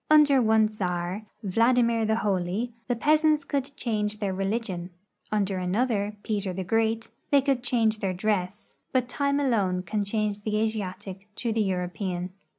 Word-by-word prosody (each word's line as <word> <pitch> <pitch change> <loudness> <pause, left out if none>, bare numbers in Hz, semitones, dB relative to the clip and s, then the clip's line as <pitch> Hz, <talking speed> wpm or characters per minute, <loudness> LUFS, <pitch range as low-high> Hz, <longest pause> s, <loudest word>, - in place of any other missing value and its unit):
• - - -53
Under 295 -3 +6
one 220 -1 +4
czar, 185 0 -3 0.2
Vladimir 230 +3 +3
the 220 0 +2
Holy, 205 +2 -1
the 245 - +1
peasants 305 +3 +3
could 275 -2 -1
change 210 -3 -1
their 200 -3 -2
religion; 195 -2 -2 0.4
under 200 -3 0
another, 205 +2 0
Peter 205 -3 -1
the 190 +1 -3
Great, 225 +3 0 0.2
they 285 - +6
could 270 -2 +1
change 225 -3 +1
their 195 -2 0
dress, 190 +1 -2
but 255 -2 +1
time 280 +2 0
alone 200 -10 +1
can 205 +3 -1
change 210 0 -1
the 210 0 -1
Asiatic 200 -2 -3
to 235 -3 -1
the 225 - +1
Euro 185 -3 0
pean. 180 -1 -4
215 Hz, 160 wpm, -27 LUFS, 190-235 Hz, 0.4 s, Under